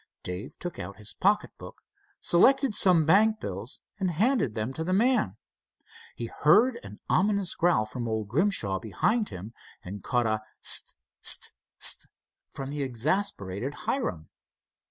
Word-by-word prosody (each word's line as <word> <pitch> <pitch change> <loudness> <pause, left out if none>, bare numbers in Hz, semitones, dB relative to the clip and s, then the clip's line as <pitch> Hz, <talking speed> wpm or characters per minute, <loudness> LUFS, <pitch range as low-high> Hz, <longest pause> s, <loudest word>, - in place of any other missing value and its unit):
Dave 90 +2 -7
took 175 -2 -6
out 95 +2 -7
his 105 -1 -8
pocket 210 +3 +1
book, - - -12 0.4
selected 265 +8 +4
some 180 -6 +4
bank 215 +6 +4
bills, 100 - -7 0.2
and 190 -2 0
handed 195 - +1
them 110 +4 -3
to 160 - -4
the 185 +3 -1
man. 220 - +2 0.8
He 120 - -5
heard 220 - +3
an - - -11
ominous 200 -1 +1
growl 170 -11 +2
from 120 +2 -5
old 110 -2 -2
Grimshaw 115 - 0
behind 205 - 0
him, 100 +6 -9 0.3
and 95 +2 -8
caught 120 -2 0
a 110 -1 0 0.2
"S't! - - +4 0.3
S't! - - +3 0.3
S't!" - - +1 0.4
from 135 0 -7
the 145 0 -3
exasperated 130 - -1
Hiram. 85 - -2
145 Hz, 145 wpm, -27 LUFS, -, 0.8 s, selected